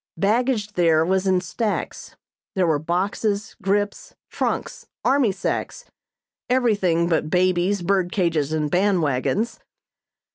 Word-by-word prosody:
Baggage 215 +2 +1
there 165 -3 +3
was 190 +2 +1
in 185 -1 +3
stacks. 210 +4 -4 0.4
There 185 -2 +2
were 160 -3 +2
boxes, 200 +5 -1
grips, 205 - -1 0.2
trunks, - - -3 0.2
army 265 -5 +3
sacks; - - -3 0.6
everything 200 -10 +2
but 160 -2 0
babies, 180 +2 +1
bird 185 -1 +1
cages 165 -6 0
and 155 -2 -1
band 185 -1 +2
wagons. 150 - -1
190 Hz, 115 wpm, -22 LUFS, 170-205 Hz, 0.6 s, there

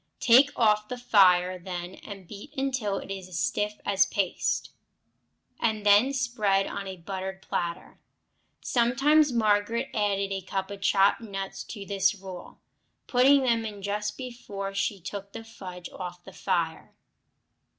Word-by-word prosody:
Take 260 +4 +6
off 210 -2 +3
the 250 - -5
fire 185 -6 +4
then, 175 0 -6
and 195 -3 -10
beat 210 - -11
until 255 -7 -1
it - - -7
is 190 -2 -6
a 185 - -15
stiff 210 +2 -1 0.3
paste, 195 -3 -1 0.9
and 215 -2 0
then 205 +6 +6
spread 225 -7 +1
on 195 - -5
a 190 -1 -6
buttered 190 +2 -6
platter. 170 -1 -4 0.6
Sometimes 270 +5 +3
Margaret 215 0 +1
added 200 -2 0
a 195 0 -2
cup 190 +1 -4
of 200 -1 -8
chopped 195 +1 +3
nuts 195 -3 -5
to 205 -4 -8
this 195 0 +1
rule, 190 -2 -10 0.5
putting 265 +2 +5
them 230 -3 +2
in 205 -3 -7
just 210 +1 -2
before 220 -6 -6
she 195 0 -1
took 200 +2 -7
the 225 - -7
fudge 185 -6 -9
off 180 -1 -7
the 190 - -12
fire. 170 -4 -2
200 Hz, 145 wpm, -27 LUFS, 190-230 Hz, 0.9 s, Take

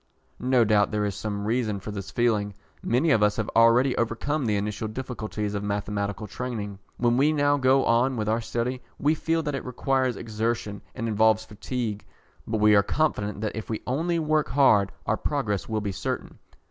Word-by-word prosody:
No 125 -1 +3
doubt 105 -1 +3
there 105 -1 -1
is 100 - -1
some 100 0 -4
reason 110 -2 0
for 105 - -7
this 100 -2 -6
feeling. 105 -4 0 0.3
Many 135 +7 +2
of 110 - +4
us 105 0 +3
have 110 -2 -3
already 115 +3 +5
overcome 120 +4 -1
the 105 - +1
initial 105 +2 -2
difficulties 110 -3 -4
of 100 - -2
mathematical 100 0 -2
training. 105 -3 -5 0.2
When 120 0 +2
we 145 +3 +4
now 145 -1 +2
go 135 0 +3
on 120 +2 +2
with 105 -1 -2
our 110 +2 +1
study, 120 +3 -2 0.2
we 150 +3 +2
feel 165 +1 0
that 150 -1 -2
it 135 - -3
requires 130 0 0
exertion 110 -2 -3
and 115 - -3
involves 110 0 +3
fatigue, 110 0 -4 0.4
but 110 - -1
we 105 0 +5
are 100 - +6
confident 105 -6 -1
that 110 - -2
if 110 - -6
we 110 - -3
only 165 +7 0
work 155 -1 +1
hard 110 -8 +4
our - - +1
progress 115 -10 -2
will 110 -1 -1
be 100 -1 -2
certain. 95 +1 -4
115 Hz, 190 wpm, -26 LUFS, 105-130 Hz, 0.4 s, are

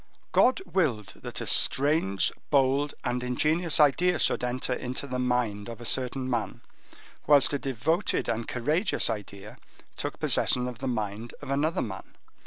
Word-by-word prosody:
God 255 -5 +3
willed 155 - -1
that - - -7
a - - -4
strange, 135 - +3 0.2
bold, 140 +1 +2
and 125 0 -1
ingenious 155 +7 +1
idea 160 +4 +4
should 130 - +2
enter 125 +1 -2
into 125 +2 -5
the 125 -2 -4
mind 120 -4 -1
of 115 - -8
a 120 - -9
certain 130 +1 0
man, 120 -4 -3 0.7
whilst 145 -1 +5
a 145 - 0
devoted 140 - -1
and 115 0 -2
courageous 150 - +1
idea 105 -1 -8 0.4
took - - -4
possession 125 0 +2
of 125 -2 -7
the 135 - -4
mind 110 -1 -4
of - - -7
another 155 +6 0
man. 95 -3 -8
125 Hz, 155 wpm, -27 LUFS, 115-150 Hz, 0.7 s, whilst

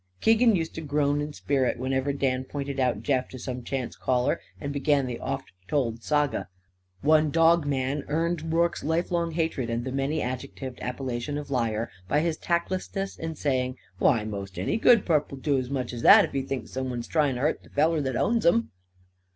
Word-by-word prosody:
Keegan 225 0 +5
used 165 -2 -2
to 160 - -5
groan 145 -1 +1
in 150 +1 -4
spirit 135 -4 0
whenever 130 +2 0
Dan 130 -2 0
pointed 140 0 -5
out 125 -5 +1
Jeff 130 -1 0
to 130 - -9
some 125 0 -5
chance 130 -1 -3
caller 125 +5 0 0.2
and 140 -1 -4
began 140 -1 +2
the 125 -2 -4
oft 135 0 -4 0.2
told 120 -6 0
saga. 150 +1 0 0.5
One 155 +1 +4
dog 165 0 +4
man 140 +1 -1
earned 165 +1 -1
Rorke's 170 +1 +1
lifelong 170 +2 0
hatred 160 -7 -1
and 115 +1 -2
the 130 - -3
many 135 +4 -1
adjectived 130 0 -5
appellation 125 +2 -3
of 145 -1 -6
liar 115 -3 -1 0.2
by 150 +9 +2
his 165 -1 -1
tactlessness 185 +3 -2
in 160 0 -5
saying: 130 -3 -1 0.2
"Why, 115 -7 +3
most 100 -3 -6
any 90 - 0
good 230 -2 +5
purp 150 -4 +2
will 140 - -7
do 140 0 +1
as 125 -1 -4
much 130 -3 -3
as 120 - -5
that; - - +8
if - - -9
he 135 - -1
thinks 130 -4 -5
someone's 125 -2 -3
trying 150 -5 +1
to 125 - -4
hurt 150 +3 +1
the - - -19
feller 155 +2 +2
that 130 -3 -2
owns 230 - +1
him." 115 -9 +3
140 Hz, 195 wpm, -27 LUFS, 130-155 Hz, 0.5 s, that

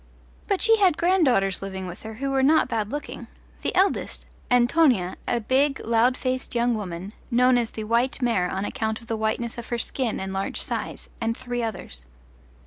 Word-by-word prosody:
But 395 -3 0
she 450 0 +5
had 375 -6 +4
granddaughters 270 - +3
living 190 -1 -5
with 180 -1 -8
her 220 0 -8
who 275 +4 -2
were 270 0 +2
not 305 +4 +4
bad 220 -4 -2
looking: 290 0 -6 0.3
the - - -2
eldest, 380 +2 +1 0.2
Antonia, 245 - +3
a 240 - +1
big 270 +5 +2
loud 235 +3 +3
voiced 255 -1 -2
young 240 +1 +2
woman, 190 -2 -5 0.2
known 250 +1 +4
as 235 -2 +1
the 220 - -6
"white 235 +6 +1
mare" 230 -8 +1
on 190 +1 -2
account 220 -3 -2
of - - -14
the 225 -1 -2
whiteness 220 +2 -2
of 235 - -8
her 240 - -2
skin 235 0 -1
and 190 0 -4
large 195 0 -2
size, - - -3
and 225 0 -1
three 245 -1 -3
others. 175 - -5
235 Hz, 190 wpm, -25 LUFS, 215-260 Hz, 0.3 s, she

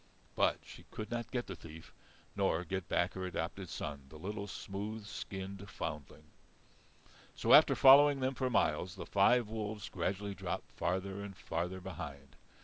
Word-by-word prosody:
But - - +3
she - - -13
could 110 0 -6
not 120 -1 -3
get 125 -2 -2
the 95 - -6
thief, 80 -1 -12 0.4
nor 80 +2 +1
get 95 +1 -4
back 85 - +1
her 95 - -5
adopted 90 +1 -4
son, 70 -4 -5
the 80 - -11
little 100 +5 -5
smooth 100 +2 -5
skinned 100 -1 -6
foundling. 75 -1 -6 1.1
So - - +3
after - - +8
following 140 +1 +8
them 130 +1 0
for 130 -1 -1
miles, 90 -4 +1
the 95 - -7
five 115 +4 +4
wolves 105 -1 -4
gradually 100 +3 -2
dropped - - -5
farther 95 +2 -2
and 100 -3 -8
farther 90 +3 -3
behind. 75 -6 -8
95 Hz, 155 wpm, -34 LUFS, 85-105 Hz, 1.1 s, after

